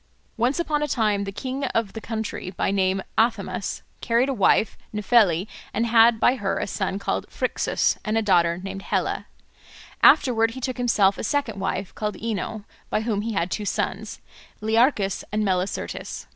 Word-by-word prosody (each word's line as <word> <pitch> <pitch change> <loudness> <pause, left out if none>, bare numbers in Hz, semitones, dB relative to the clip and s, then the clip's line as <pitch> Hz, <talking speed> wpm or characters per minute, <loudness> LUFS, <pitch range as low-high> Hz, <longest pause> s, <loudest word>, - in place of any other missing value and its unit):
Once 245 +7 +1
upon 305 -3 0
a 300 - 0
time 210 -6 +1
the 195 - -4
king 260 +7 -4
of 230 -5 -1
the 225 - -6
country, 220 -4 -4
by 185 - -1
name 190 -1 +1 0.2
Athamas, 230 +1 -1 0.3
married 235 +4 +3
a - - +1
wife 215 -1 +3 0.2
Nephele, 210 -5 +3 0.3
and 230 +3 +1
had 230 0 +5
by 250 +4 +3
her 200 -4 -1
a - - -1
son 195 -1 -2
called 200 - -2
Phrixus - - 0
and 215 +1 0
a 225 - +1
daughter 170 -4 +3
named 195 +1 -6
Helle. - - -1 0.8
Afterwards 230 -3 +5
he - - -5
took 255 0 -3
to - - -3
himself 205 -5 +3
a - - -4
second 225 -4 -1
wife 195 0 -3
called 210 -1 -3
Ino, 220 -1 -3 0.3
by - - 0
whom 220 -3 -1
he 225 +1 -3
had 175 -1 -1
two 210 - -2
sons, 205 +1 -3 0.4
Learchus 220 -2 +2
and 215 +1 0
Melicertes. 185 0 -3
215 Hz, 175 wpm, -24 LUFS, 195-235 Hz, 0.8 s, had